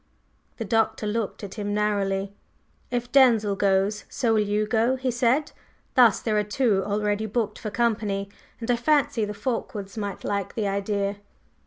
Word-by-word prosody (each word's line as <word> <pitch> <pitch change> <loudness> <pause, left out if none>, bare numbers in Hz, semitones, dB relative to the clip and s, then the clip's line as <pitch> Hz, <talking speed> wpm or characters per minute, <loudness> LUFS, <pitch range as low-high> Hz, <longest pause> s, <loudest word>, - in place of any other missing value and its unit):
The 225 - -4
Doctor 225 +1 +1
looked 210 0 -2
at 195 - -6
him 205 0 -2
narrowly. 200 -2 0 0.6
"If 245 0 -3
Denzil 230 -7 +5
goes, 195 +1 +1
so 235 -3 0
will 215 - +3
you 210 +1 0
go," 225 +4 +2
he 260 -1 -1
said. 245 +5 +1 0.4
"Thus 240 -5 +6
there 215 -2 +1
are - - +1
two 210 -1 +1
already 210 +1 -1
booked 215 -1 -2
for 215 - -4
company. 210 -3 0 0.3
And 235 +1 -1
I 240 - +2
fancy 255 -4 +2
the 210 - -5
Fulkewards 220 -5 -4
might 200 -2 -5
like 200 -2 -2
the 215 -3 0
idea." 200 0 -1
210 Hz, 165 wpm, -25 LUFS, 200-235 Hz, 0.6 s, Thus